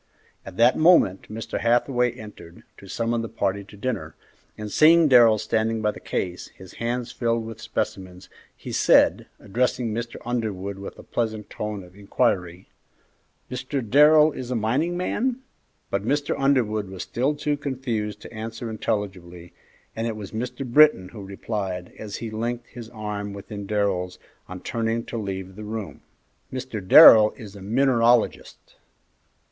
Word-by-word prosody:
At 95 -1 -10
that 120 +2 +5
moment 155 - +4
Mr. 110 0 -5
Hathaway 120 +1 +2
entered 105 -7 -12 0.2
to 100 - -13
summon 115 +3 -1
the 115 - -5
party 100 +1 -2
to 105 +1 -15
dinner, 115 -1 -4 0.4
and 105 -1 -6
seeing 165 +1 +6
Darrell 120 -5 +6
standing 110 +1 -1
by 105 -1 +1
the - - -11
case, 90 -1 -4
his 95 - -15
hands 120 +1 -2
filled 115 -2 -1
with 115 0 -9
specimens, 95 -4 -5 0.3
he - - -8
said, - - +4
addressing 120 +2 -1
Mr. 115 +1 -5
Underwood 100 -5 -3
with 100 - -8
a - - -12
pleasant 110 -3 -3
tone 105 -2 -5
of 90 0 -17
inquiry, 95 -4 -1 0.8
"Mr. 130 0 -4
Darrell 150 +5 +6
is 130 -3 -7
a 125 - -1
mining 135 +11 0
man?" 245 +7 -2 0.5
But 100 0 -1
Mr. 145 +5 0
Underwood 115 -7 +1
was 95 -1 -6
still 135 +5 -1
too 145 0 -1
confused 125 -7 -4
to - - -11
answer 115 +1 -6
intelligibly, 90 -5 -4 0.4
and 115 +1 -2
it 115 - -3
was 105 -2 -8
Mr. 125 +4 -4
Britton 125 -7 +5
who 105 -1 -10
replied, 95 -2 -5
as 105 -2 -6
he 115 -2 -6
linked 120 +2 -3
his 115 -2 -11
arm 105 -2 -5
within 100 0 -8
Darrell's 95 -4 -1 0.3
on 90 0 -8
turning 115 0 -2
to - - -6
leave 95 -2 -5
the 105 - -8
room, 110 -1 -6 0.5
"Mr. 130 -4 -5
Darrell 105 +3 +9
is 105 -5 -11
a 100 - -11
mineralogist." 120 +2 +1
110 Hz, 155 wpm, -24 LUFS, 100-125 Hz, 0.8 s, Darrell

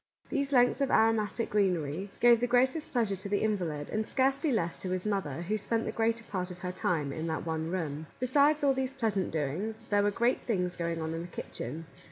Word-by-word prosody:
These 280 -2 -1
lengths 245 +1 +4
of 275 - +2
aromatic 225 0 +2
greenery 185 -3 0
gave 240 -1 +6
the 245 - +1
greatest 260 +6 +2
pleasure 225 -6 +1
to 200 +2 -5
the 205 - +1
invalid, 175 -9 -1
and 215 - 0
scarcely 275 +3 +1
less 175 -8 0
to 185 - -4
his 185 +1 -2
mother, 180 -7 -2
who 210 +5 -1
spent 230 +2 -1
the - - -2
greater 230 +1 0
part 185 -4 -3
of 180 - -8
her 180 - -1
time 155 -6 -1
in 160 +2 -3
that 160 0 -2
one 160 -1 -2
room. 160 -4 -3
Besides 285 +4 +3
all 275 -1 +5
these 265 -1 -1
pleasant 220 -8 -1
doings, 165 +9 -3
there 205 0 +4
were 205 - +3
great 235 +5 +1
things 180 -6 -1
going 170 -1 -2
on 160 0 -3
in 165 - -3
the 175 - -6
kitchen. 160 -2 -6
205 Hz, 220 wpm, -30 LUFS, 170-240 Hz, -, gave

